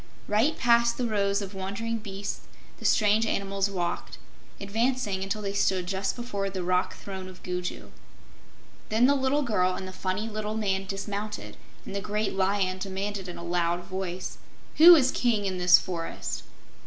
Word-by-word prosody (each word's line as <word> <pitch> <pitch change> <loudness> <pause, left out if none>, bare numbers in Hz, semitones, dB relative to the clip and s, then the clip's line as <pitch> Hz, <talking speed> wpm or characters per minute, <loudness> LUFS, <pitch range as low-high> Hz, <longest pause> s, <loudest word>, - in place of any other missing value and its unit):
Right 230 +10 +2
past 235 -1 +4
the 250 - 0
rows 200 -2 +1
of 195 0 -7
wondering 200 +4 -3
beasts 200 -1 -6 0.3
the - - -9
strange 215 +1 +4
animals 195 -1 0
walked, 175 -3 -3 0.4
advancing 210 -1 0
until 200 +2 -2
they 200 0 -2
stood 190 -2 +1
just 190 +1 -1
before 205 -5 -3
the 190 -2 -4
rock 180 +1 +1
throne 190 -2 -7
of 185 -1 -12
Gugu. 180 0 -4 1.0
Then 220 +3 +4
the 280 - +5
little 275 +2 +1
girl 185 -7 +1
and 190 - -5
the - - -6
funny 190 +4 -2
little 215 -1 -3
man 195 -3 -1
dismounted, 205 +2 -4 0.3
and - - -7
the 200 - -1
great 210 +1 -1
Lion 190 -1 +1
demanded 195 +1 -4
in 175 - -7
a - - -8
loud 175 0 0
voice: 185 -1 -5 0.4
"Who 340 +3 +11
is 260 -5 +4
King 225 -5 +1
in 185 -2 -2
this 180 0 +8
forest?" 170 -3 -4
200 Hz, 165 wpm, -27 LUFS, 185-215 Hz, 1.0 s, Who